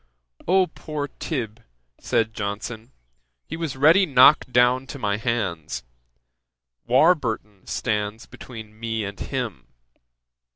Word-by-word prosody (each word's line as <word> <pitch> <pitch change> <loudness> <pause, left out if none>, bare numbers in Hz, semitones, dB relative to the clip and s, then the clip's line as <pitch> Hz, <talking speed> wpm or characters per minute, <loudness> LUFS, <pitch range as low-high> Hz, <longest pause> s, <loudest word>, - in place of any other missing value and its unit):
"O 185 +2 +5
poor 150 -3 -6
Tib.! 115 -7 -4 0.4
(said 110 -1 0
Johnson) 110 +3 -5 0.5
he - - -6
was 165 -5 -4
ready 165 +8 +6
knocked 130 -1 +6
down 125 +2 +3
to 140 - -7
my 105 -5 -1
hands; 105 -9 -2 1.0
Warburton 120 - +2
stands 105 0 -2
between 110 -3 -11
me 115 -1 -2
and 100 0 -6
him." 120 - -4
120 Hz, 110 wpm, -24 LUFS, 105-140 Hz, 1.0 s, ready